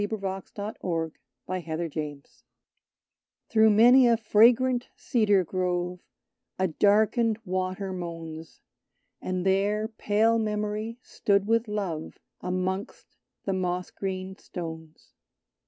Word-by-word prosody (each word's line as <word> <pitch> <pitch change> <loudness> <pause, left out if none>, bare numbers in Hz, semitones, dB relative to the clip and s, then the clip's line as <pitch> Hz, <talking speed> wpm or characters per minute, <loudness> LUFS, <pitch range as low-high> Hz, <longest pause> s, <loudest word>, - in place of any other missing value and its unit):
Ella 205 - 0
with 220 -2 -4 0.3
the 175 -6 -3 0.3
Shining 170 -2 -3
Hair 150 -2 -3 1.3
Through 220 -1 +6
many 240 +4 +7
a 235 -1 +4
fragrant 240 +3 +4
cedar 205 -5 +2
grove 180 0 -2 0.6
A 190 - +2
darkened 215 +5 +3
water 185 +1 -2
moans; 165 -2 -7 0.6
And 185 0 -2
there 205 +3 +2
pale 220 0 +2
Memory 215 +1 -2
stood 200 -1 +1
with 230 +1 +2
Love 190 -7 -4 0.2
Amongst 185 +2 -3 0.3
the 195 - 0
moss 180 -1 -2
green 190 -1 -4
stones. 160 -4 -9
195 Hz, 105 wpm, -27 LUFS, 180-215 Hz, 1.3 s, many